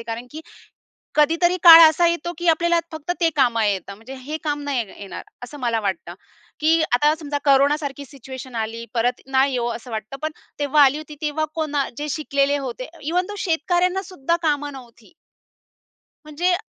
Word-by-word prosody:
आहे. -, -, -10 dB
कारण 235 Hz, +2 st, -7 dB
की 310 Hz, -, -8 dB, 0.8 s
कधीतरी 335 Hz, +4 st, +3 dB
काळ 335 Hz, -1 st, +11 dB
असा 340 Hz, +2 st, +2 dB
येतो 340 Hz, +1 st, -2 dB
की 345 Hz, 0 st, -3 dB
आपल्याला 340 Hz, +1 st, +3 dB
फक्त 315 Hz, +2 st, -4 dB
ते 330 Hz, -, +4 dB
कामा 235 Hz, -5 st, +2 dB
येतं 200 Hz, -1 st, -2 dB
म्हणजे 230 Hz, +6 st, -11 dB
हे 280 Hz, +4 st, -6 dB
काम 295 Hz, -2 st, -2 dB
नाही 270 Hz, -5 st, -1 dB
येणार, 200 Hz, -, -8 dB, 0.2 s
असं 285 Hz, +4 st, -9 dB
मला 235 Hz, -2 st, 0 dB
वाटतं. 195 Hz, -2 st, -3 dB, 0.5 s
की 320 Hz, +2 st, +3 dB
आता 295 Hz, +5 st, +4 dB
समजा 290 Hz, -2 st, -3 dB
कोरोनासारखी 280 Hz, 0 st, +2 dB
सिच्युएशन 260 Hz, -1 st, -10 dB
आली, 225 Hz, +1 st, -4 dB
परत 245 Hz, +1 st, 0 dB
ना 270 Hz, 0 st, +3 dB
येवो 245 Hz, -3 st, -1 dB
असं 235 Hz, +1 st, -9 dB
वाटतं. 220 Hz, +4 st, -5 dB
पण 310 Hz, -, -2 dB, 0.3 s
तेव्हा 290 Hz, 0 st, +4 dB
आली 275 Hz, +2 st, +4 dB
होती 310 Hz, -1 st, -9 dB
तेव्हा 310 Hz, +1 st, -1 dB
कोणा 295 Hz, -3 st, -1 dB
जे 300 Hz, +1 st, -4 dB
शिकलेले 285 Hz, -1 st, 0 dB
होते 255 Hz, -2 st, -6 dB
इव्हन 345 Hz, +5 st, 0 dB
दो 415 Hz, -, -7 dB
शेतकऱ्यांना 360 Hz, +2 st, 0 dB
सुद्धा 340 Hz, -3 st, -2 dB
कामं 290 Hz, -2 st, 0 dB
नव्हती. 240 Hz, +1 st, -14 dB, 1.1 s
म्हणजे 305 Hz, +4 st, -1 dB
अ 350 Hz, -, -1 dB
290 Hz, 175 wpm, -22 LUFS, 255-320 Hz, 1.1 s, काळ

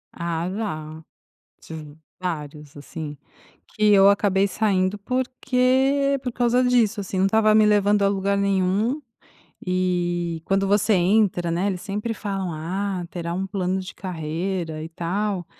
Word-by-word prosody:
Ah, 170 Hz, 0 st, -2 dB
já. 160 Hz, -7 st, -5 dB, 0.6 s
Tive 155 Hz, -2 st, -10 dB, 0.2 s
vários, 150 Hz, -4 st, -5 dB
assim, 145 Hz, +1 st, -7 dB, 0.5 s
que 210 Hz, -1 st, +2 dB
eu 195 Hz, 0 st, +7 dB
acabei 200 Hz, -1 st, +3 dB
saindo 195 Hz, -1 st, 0 dB
porque 260 Hz, +3 st, +1 dB
por 250 Hz, -, -3 dB
causa 245 Hz, +1 st, +2 dB
disso, 230 Hz, -4 st, +2 dB
assim, 190 Hz, -1 st, -4 dB
não 190 Hz, -, +3 dB
estava 215 Hz, +1 st, +3 dB
me 215 Hz, 0 st, +6 dB
levando 205 Hz, 0 st, +3 dB
a 200 Hz, -, +4 dB
lugar 200 Hz, 0 st, 0 dB
nenhum. 200 Hz, +7 st, +1 dB, 0.7 s
E 175 Hz, -2 st, -1 dB
quando 195 Hz, 0 st, +1 dB
você 205 Hz, +1 st, +3 dB
entra, 180 Hz, -1 st, +2 dB
né, 175 Hz, +4 st, 0 dB
eles 185 Hz, -3 st, -2 dB
sempre 210 Hz, +2 st, -3 dB
falam: 195 Hz, -4 st, -3 dB
"Ah, 185 Hz, +4 st, -3 dB
terá 170 Hz, -1 st, -4 dB
um 190 Hz, +1 st, -2 dB
plano 190 Hz, -1 st, -1 dB
de 185 Hz, -, -8 dB
carreira 165 Hz, -1 st, -4 dB
e 160 Hz, -, -6 dB
tal". 180 Hz, +2 st, -2 dB
195 Hz, 140 wpm, -23 LUFS, 175-210 Hz, 0.7 s, eu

